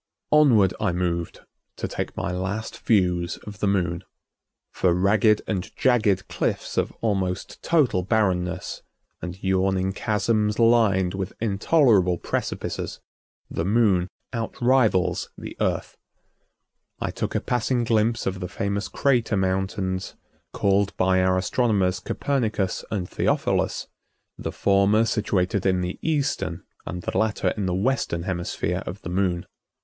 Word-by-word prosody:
Onward 120 Hz, -11 st, +5 dB
I 105 Hz, -4 st, +1 dB
moved 85 Hz, -1 st, -2 dB, 0.3 s
to -, -, -3 dB
take -, -, -5 dB
my 85 Hz, -, -2 dB
last 95 Hz, +4 st, -4 dB
views 90 Hz, -5 st, +1 dB
of 105 Hz, -1 st, -9 dB
the 105 Hz, -, +1 dB
Moon. 90 Hz, -3 st, 0 dB, 0.7 s
For 90 Hz, -2 st, +2 dB
ragged 105 Hz, +3 st, +3 dB
and 95 Hz, -4 st, -3 dB
jagged 110 Hz, -7 st, +2 dB
cliffs -, -, -2 dB
of -, -, 0 dB
almost 95 Hz, -5 st, -2 dB
total 145 Hz, -, +2 dB
barrenness, 90 Hz, -3 st, 0 dB, 0.4 s
and 90 Hz, 0 st, -5 dB
yawning 95 Hz, 0 st, +1 dB
chasms 105 Hz, 0 st, 0 dB
lined 110 Hz, -6 st, +4 dB
with 95 Hz, 0 st, -4 dB
intolerable 105 Hz, -, +3 dB
precipices, -, -, -3 dB, 0.5 s
the 80 Hz, -, -3 dB
Moon 100 Hz, -3 st, +3 dB, 0.3 s
outrivals 115 Hz, -4 st, +1 dB
the -, -, -8 dB
Earth. -, -, -1 dB, 1.0 s
I -, -, -2 dB
took -, -, -4 dB
a -, -, +3 dB
passing 125 Hz, 0 st, 0 dB
glimpse 115 Hz, 0 st, +1 dB
of 95 Hz, 0 st, -2 dB
the 90 Hz, -2 st, -5 dB
famous 100 Hz, +2 st, -2 dB
crater 120 Hz, -6 st, +1 dB
mountains, 95 Hz, 0 st, -1 dB, 0.4 s
called 100 Hz, 0 st, +1 dB
by 95 Hz, 0 st, +3 dB
our 95 Hz, 0 st, +3 dB
astronomers 95 Hz, -2 st, +1 dB
Copernicus 110 Hz, -3 st, -1 dB
and 95 Hz, -4 st, -2 dB
Theophilus, -, -, 0 dB, 0.5 s
the -, -, -5 dB
former 100 Hz, +3 st, +3 dB
situated 100 Hz, -3 st, 0 dB
in 90 Hz, -1 st, +2 dB
the 90 Hz, +1 st, -4 dB
eastern 140 Hz, -, -1 dB, 0.2 s
and 90 Hz, -2 st, -5 dB
the -, -, -4 dB
latter 110 Hz, -1 st, +1 dB
in 100 Hz, -3 st, -2 dB
the 90 Hz, -, 0 dB
western 100 Hz, -5 st, 0 dB
hemisphere 90 Hz, -1 st, -2 dB
of -, -, -6 dB
the -, -, -5 dB
Moon. 90 Hz, -1 st, 0 dB
95 Hz, 130 wpm, -24 LUFS, 90-110 Hz, 1.0 s, Onward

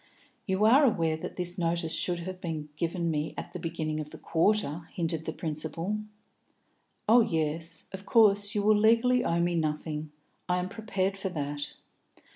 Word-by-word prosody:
"You 190 Hz, +2 st, +2 dB
are 260 Hz, +7 st, +7 dB
aware 165 Hz, -, +2 dB
that 160 Hz, -, -7 dB
this 180 Hz, +1 st, -2 dB
notice 165 Hz, -1 st, 0 dB
should 175 Hz, -1 st, +1 dB
have 185 Hz, +1 st, -6 dB
been 155 Hz, -3 st, -4 dB
given 170 Hz, +1 st, -1 dB
me 150 Hz, 0 st, -2 dB
at -, -, -6 dB
the 180 Hz, -, -5 dB
beginning 160 Hz, -2 st, -3 dB
of 150 Hz, -1 st, -5 dB
the -, -, -10 dB
quarter?" 165 Hz, -2 st, +1 dB
hinted 165 Hz, -2 st, -1 dB
the -, -, 0 dB
principal. 165 Hz, +6 st, -3 dB, 1.1 s
"Oh 235 Hz, +3 st, +7 dB
yes. 165 Hz, -3 st, -1 dB
Of 190 Hz, 0 st, -6 dB
course 205 Hz, -3 st, +4 dB
you 205 Hz, -, +1 dB
will 215 Hz, +1 st, +5 dB
legally 230 Hz, +4 st, +4 dB
owe 170 Hz, 0 st, +1 dB
me 175 Hz, +1 st, +1 dB
nothing. 155 Hz, -1 st, -2 dB, 0.4 s
I 180 Hz, -, +3 dB
am 180 Hz, +1 st, -2 dB
prepared 195 Hz, -3 st, -2 dB
for 195 Hz, 0 st, -3 dB
that." 145 Hz, -3 st, -4 dB
170 Hz, 170 wpm, -29 LUFS, 160-200 Hz, 1.1 s, are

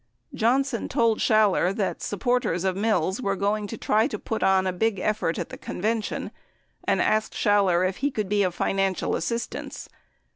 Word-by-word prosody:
Johnson 250 Hz, +2 st, +1 dB
told 230 Hz, -2 st, +2 dB
Schaller 210 Hz, -4 st, +3 dB
that 205 Hz, -4 st, -2 dB
supporters 210 Hz, -3 st, 0 dB
of 190 Hz, -1 st, 0 dB
Mills 195 Hz, 0 st, 0 dB
were 195 Hz, -4 st, 0 dB
going 205 Hz, +2 st, -1 dB
to 225 Hz, -, -6 dB
try 215 Hz, +3 st, +2 dB
to -, -, -4 dB
put 225 Hz, -, -4 dB
on 190 Hz, 0 st, +3 dB
a 185 Hz, -, 0 dB
big 215 Hz, +3 st, 0 dB
effort 195 Hz, -3 st, -1 dB
at -, -, -4 dB
the -, -, -9 dB
convention, 220 Hz, +3 st, -3 dB, 0.5 s
and -, -, +1 dB
asked 215 Hz, 0 st, +1 dB
Schaller 190 Hz, -3 st, +3 dB
if 185 Hz, -, -4 dB
he 285 Hz, -, 0 dB
could 215 Hz, -7 st, -3 dB
be 205 Hz, +1 st, +1 dB
of 180 Hz, -3 st, 0 dB
financial 195 Hz, 0 st, 0 dB
assistance. 235 Hz, 0 st, -4 dB
205 Hz, 175 wpm, -25 LUFS, 190-225 Hz, 0.5 s, Schaller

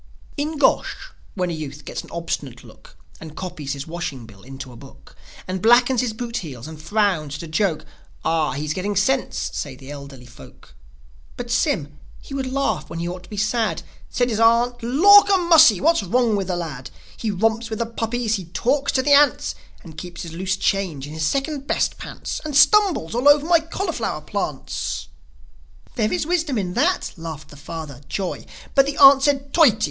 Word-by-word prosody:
In 305 Hz, +2 st, -3 dB
Gosh, -, -, +1 dB, 0.2 s
when 180 Hz, -3 st, -1 dB
a -, -, -3 dB
youth 150 Hz, -2 st, -7 dB
gets -, -, -5 dB
an -, -, -15 dB
obstinate 145 Hz, -7 st, -5 dB
look, -, -, -17 dB, 0.2 s
And 160 Hz, -1 st, -11 dB
copies 165 Hz, -6 st, -5 dB
his 140 Hz, 0 st, -6 dB
washing 160 Hz, -7 st, -5 dB
bill 100 Hz, -3 st, -16 dB
into 135 Hz, +2 st, -9 dB
a -, -, -13 dB
book, -, -, -16 dB, 0.3 s
And 185 Hz, 0 st, -3 dB
blackens 240 Hz, +2 st, +4 dB
his 245 Hz, -3 st, -1 dB
boot 235 Hz, +2 st, -5 dB
heels, 130 Hz, -7 st, -7 dB
and 155 Hz, -1 st, -10 dB
frowns 170 Hz, -5 st, 0 dB
at 145 Hz, -, -7 dB
a -, -, -7 dB
joke, 160 Hz, 0 st, -1 dB, 0.4 s
"Ah, 160 Hz, -4 st, +1 dB
he's 150 Hz, +2 st, -3 dB
getting 200 Hz, +4 st, -3 dB
sense," 255 Hz, +7 st, 0 dB
say 140 Hz, -3 st, -5 dB
the 135 Hz, +2 st, -11 dB
elderly 140 Hz, -3 st, -10 dB
folk. 120 Hz, -, -16 dB, 0.6 s
But 240 Hz, -1 st, -6 dB
Sym, 170 Hz, -, 0 dB, 0.2 s
he -, -, -12 dB
would 265 Hz, -2 st, -3 dB
laugh 275 Hz, +1 st, -1 dB
when 165 Hz, -, -6 dB
he 170 Hz, +1 st, -3 dB
ought 180 Hz, +1 st, -6 dB
to -, -, -19 dB
be 210 Hz, -, -8 dB
sad; 210 Hz, -3 st, 0 dB, 0.3 s
Said 245 Hz, 0 st, 0 dB
his 215 Hz, -, -1 dB
aunt, 235 Hz, +2 st, +3 dB
"Lawk 395 Hz, -, +6 dB
a 390 Hz, -, +5 dB
mussy! 320 Hz, -, +6 dB
What's 330 Hz, -, +3 dB
wrong 225 Hz, +3 st, +1 dB
with 195 Hz, -2 st, -2 dB
the 180 Hz, -, -1 dB
lad? 150 Hz, -8 st, -6 dB, 0.3 s
He 225 Hz, -, -3 dB
romps 225 Hz, +3 st, 0 dB
with 220 Hz, -, -4 dB
the 235 Hz, -, -1 dB
puppies, 225 Hz, -1 st, -2 dB
and 170 Hz, -3 st, -11 dB
talks 275 Hz, +3 st, +1 dB
to 260 Hz, -, +1 dB
the 290 Hz, +1 st, +4 dB
ants, 285 Hz, +1 st, +4 dB, 0.3 s
And 160 Hz, -3 st, -10 dB
keeps 175 Hz, -1 st, -8 dB
his 165 Hz, -2 st, -8 dB
loose 190 Hz, +2 st, -2 dB
change 190 Hz, -8 st, -1 dB
in 145 Hz, -, -9 dB
his 155 Hz, 0 st, -1 dB
second 275 Hz, -, -2 dB
best -, -, 0 dB
pants, -, -, -6 dB
And 300 Hz, -3 st, -1 dB
stumbles 365 Hz, -, +4 dB
all 250 Hz, +5 st, +4 dB
over 290 Hz, 0 st, +5 dB
my 340 Hz, 0 st, +5 dB
cauliflower 325 Hz, -, -3 dB
plants!" 150 Hz, -6 st, -4 dB, 0.8 s
"There 215 Hz, -3 st, 0 dB
is 180 Hz, -, -1 dB
wisdom 325 Hz, -6 st, 0 dB
in 180 Hz, -3 st, -2 dB
that," 355 Hz, -, 0 dB
laughed 160 Hz, -2 st, -8 dB
the 145 Hz, -, -13 dB
father, 145 Hz, -2 st, -8 dB
Joi. 190 Hz, +1 st, -4 dB, 0.3 s
But 275 Hz, -1 st, +4 dB
the 285 Hz, -, -3 dB
aunt 275 Hz, -1 st, +8 dB
said, 275 Hz, -1 st, 0 dB
"Toity!" 305 Hz, -, +5 dB
205 Hz, 195 wpm, -22 LUFS, -, 0.8 s, aunt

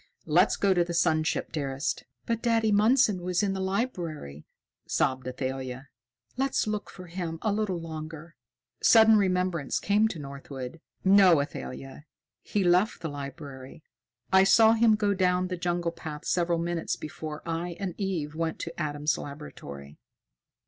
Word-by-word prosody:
"Let's 170 Hz, +4 st, +3 dB
go 200 Hz, -1 st, +3 dB
to 175 Hz, -1 st, +3 dB
the 170 Hz, 0 st, -4 dB
sun 160 Hz, -2 st, +3 dB
ship, -, -, -2 dB
dearest." 140 Hz, -2 st, -2 dB, 0.2 s
"But 230 Hz, -1 st, -1 dB
Daddy 225 Hz, -2 st, +2 dB
Mundson 210 Hz, -1 st, +4 dB
was 180 Hz, +1 st, 0 dB
in 195 Hz, -1 st, +1 dB
the 190 Hz, -, -3 dB
library," 175 Hz, -, -3 dB, 0.4 s
sobbed 130 Hz, -1 st, 0 dB
Athalia. 130 Hz, +1 st, -5 dB, 0.5 s
"Let's 270 Hz, +1 st, +1 dB
look 210 Hz, -1 st, -3 dB
for 185 Hz, -, -11 dB
him 170 Hz, -2 st, -5 dB
a 215 Hz, -, +2 dB
little 205 Hz, -4 st, -1 dB
longer." 160 Hz, 0 st, -8 dB, 0.5 s
Sudden 220 Hz, -1 st, +7 dB
remembrance 180 Hz, -7 st, +1 dB
came 210 Hz, +2 st, +3 dB
to 200 Hz, -, -6 dB
Northwood. 140 Hz, 0 st, -8 dB, 0.2 s
"No, 190 Hz, -4 st, +7 dB
Athalia! 140 Hz, 0 st, -6 dB, 0.4 s
He 205 Hz, -, -1 dB
left 180 Hz, +4 st, +2 dB
the 160 Hz, -, -3 dB
library. 140 Hz, +1 st, -8 dB, 0.5 s
I 190 Hz, 0 st, +7 dB
saw 220 Hz, +3 st, +6 dB
him 225 Hz, -1 st, +4 dB
go 205 Hz, -1 st, +1 dB
down 180 Hz, -1 st, +1 dB
the 180 Hz, -, -2 dB
jungle 175 Hz, -1 st, -1 dB
path 155 Hz, -3 st, -8 dB
several 170 Hz, -1 st, +1 dB
minutes 170 Hz, 0 st, -2 dB
before 155 Hz, 0 st, -7 dB
I 170 Hz, +1 st, -3 dB
and 195 Hz, -3 st, -3 dB
Eve 175 Hz, -7 st, -2 dB
went 165 Hz, 0 st, -2 dB
to 165 Hz, 0 st, -6 dB
Adam's 150 Hz, 0 st, -1 dB
laboratory." 75 Hz, -, -9 dB
170 Hz, 150 wpm, -28 LUFS, 150-195 Hz, 0.5 s, Sudden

